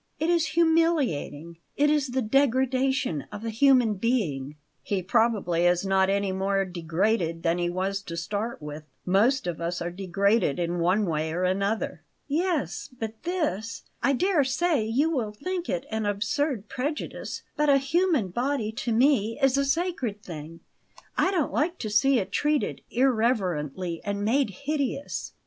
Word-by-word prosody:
It 320 +2 +1
is 335 -2 +2
humiliating; 290 - +1 0.2
it 295 +1 +4
is 295 -2 +2
the 255 0 -1
degradation 260 - +1
of 210 +2 -7
a 225 - -2
human 250 -1 +4
being." 165 - -1 0.3
"He 195 -3 -2
probably 185 -4 +2
is 175 +2 +2
not 190 0 +3
any 200 0 +1
more 195 +1 0
degraded 170 0 -1
than 170 +1 +1
he 175 0 0
was 190 +2 -2
to 170 - -6
start 205 +3 -3
with. 150 +1 -7 0.2
Most 215 +8 +3
of 170 -2 -3
us 170 +1 -2
are 175 0 -3
degraded 195 -1 +1
in 175 0 -1
one 185 +5 +2
way 160 -2 -1
or 175 +3 -1
another." 195 -1 -1 0.3
"Yes; 300 - -1
but 220 0 -5
this 300 - -2 0.2
I 275 - +3
dare 355 +1 +2
say 270 0 +1
you 265 +9 +1
will 230 -9 -1
think 355 - -4
it 175 - -2
an 220 -1 -1
absurd 230 +3 -1
prejudice; 275 +5 -4
but 300 0 +2
a 280 - +6
human 300 - +1
body, 240 +2 -1
to 235 +1 -3
me, 230 -2 +3
is 270 -2 +3
a 275 0 +2
sacred 275 - -1
thing; 165 0 -8 0.5
I - - +3
don't 355 -7 0
like 340 +4 0
to 215 - -4
see 265 +6 +4
it 195 -3 -2
treated 295 -1 0
irreverently 190 - 0
and 205 0 -2
made 260 +3 +2 0.2
hideous." 285 -1 -2
220 Hz, 160 wpm, -26 LUFS, 180-275 Hz, 0.5 s, a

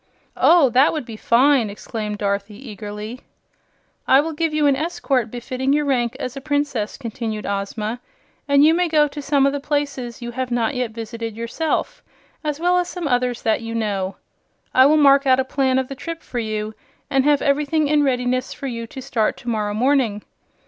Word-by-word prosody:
"Oh, 325 -7 +5
that 260 +5 +4
would 305 -5 -3
be 225 - -8
fine!" 240 +1 +3
exclaimed 210 0 -5
Dorothy, 200 +1 -2 0.2
eagerly. 210 +3 -7 0.9
"I 265 - +6
will 320 +2 -1
give 325 +1 -1
you 305 -1 +1
an 280 -1 +4
escort 275 -6 -1
befitting 255 +3 -2
your 295 0 +1
rank 250 -2 0
as 255 -2 -4
a 275 - -6
Princess," 285 -7 -1
continued 225 -4 -5
Ozma; 210 +3 -3 0.5
"and 280 0 +5
you 315 - +6
may 355 +1 +2
go 305 -2 +3
to 290 +1 -7
some 280 -1 +2
of 275 - +2
the 285 - -2
places 280 -4 -3
you 240 -1 -6
have 255 +1 -3
not 240 +1 0
yet 250 -2 -1
visited 225 0 -6
yourself, 320 - -2 0.4
as 300 -1 -2
well 355 +1 +3
as 355 0 -2
some 355 -4 -4
others 245 -2 0
that 220 0 +1
you 230 0 -5
know. 200 -4 -2 0.6
I 260 +1 +7
will 305 +2 +4
mark 280 -1 +5
out 260 0 +5
a 260 - +1
plan 265 -1 +1
of 260 -1 0
the 275 - -6
trip 330 +4 -7
for 245 - -4
you 215 -1 -3 0.4
and 270 -1 +3
have 290 0 +3
everything 295 +2 +1
in 300 0 +3
readiness 255 -2 0
for - - -8
you 230 -3 -4
to 265 +2 -9
start 230 -5 0
to 245 - -7
morrow 210 -2 -1
morning. 240 -4 +1
260 Hz, 195 wpm, -21 LUFS, 230-285 Hz, 0.9 s, I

